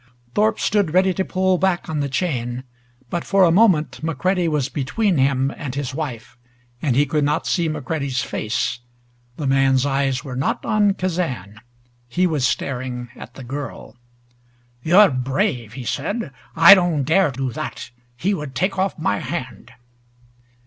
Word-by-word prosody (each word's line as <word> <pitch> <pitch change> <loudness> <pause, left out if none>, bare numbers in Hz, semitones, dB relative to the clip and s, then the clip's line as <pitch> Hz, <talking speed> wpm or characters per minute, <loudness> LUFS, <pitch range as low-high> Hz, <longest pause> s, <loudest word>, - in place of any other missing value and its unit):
Thorpe 215 +1 +2
stood 200 -6 +1
ready 190 0 +4
to 190 - -1
pull 185 -1 +1
back 190 -2 0
on 155 -2 -2
the 140 -1 -1
chain, 130 -5 -2 0.5
but 175 - -2
for 195 -1 +3
a 170 - +5
moment 165 - +3
McCready 175 +3 0
was 150 -4 0
between 165 - 0
him 135 0 +2
and 140 -5 -6
his 140 -2 -3
wife, 125 -6 -6 0.4
and 135 -6 +1
he 145 +3 +4
could 150 +1 0
not 150 +3 0
see 170 -3 0
McCready's 140 -3 -2
face. 115 +2 -2 0.6
The 150 - -4
man's 135 -1 +3
eyes 135 -2 0
were 130 -2 -6
not 135 +3 -1
on 210 -3 +2
Kazan. 135 - -3 0.5
He 180 +9 +1
was 150 -7 +1
staring 125 -2 -3
at - - -11
the 135 - -9
girl. 140 +2 -7 0.9
"You're 185 +7 +6
brave," 125 -3 -1
he 130 - -7
said. 165 - -3 0.2
"I 165 +4 +10
don't 175 -7 +2
dare 165 +4 +3
do 135 -1 -3
that. 120 - -6 0.3
He 195 +10 0
would 150 -7 -5
take 185 +1 0
off 190 +1 0
my 170 +4 0
hand!" 130 -7 -6
150 Hz, 160 wpm, -21 LUFS, 130-180 Hz, 0.9 s, I